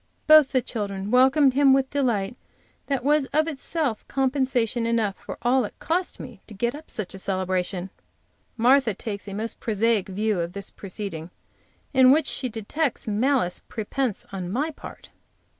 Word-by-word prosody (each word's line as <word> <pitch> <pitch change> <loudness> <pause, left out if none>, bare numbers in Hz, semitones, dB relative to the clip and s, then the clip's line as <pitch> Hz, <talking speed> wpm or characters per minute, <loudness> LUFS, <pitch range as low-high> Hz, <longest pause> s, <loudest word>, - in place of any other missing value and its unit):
Both 310 -3 +7
the 255 -2 +1
children 200 -3 -4
welcomed 265 +2 +5
him 275 0 +5
with 265 0 +1
delight 240 -7 0 0.5
that 275 -3 -1
was 290 0 +3
itself 305 -4 -1
compensation 255 -4 0
enough 225 -4 0
for - - -9
all 250 +2 +3
it 210 - -7
cost 355 +3 -2
me 235 -7 -10
to 215 - -11
get 235 +4 -1
up 305 +2 -11
such 210 -4 -5
a 190 - -7
celebration. 185 -1 -2 0.7
Martha 245 -2 +4
takes 205 -1 -6
a 200 - -6
most 225 +2 -4
prosaic 220 -2 +1
view 210 0 0
of 170 +1 -3
this 200 -1 -5
proceeding, 190 -4 -6 0.6
in 260 -1 +6
which 295 +3 +5
she 255 - 0
detects 235 +7 -2
malice 220 -3 +1
prepense 230 +1 -2
on 185 -2 -4
my 290 +9 -1
part. - - -12
235 Hz, 160 wpm, -24 LUFS, 200-270 Hz, 0.7 s, Both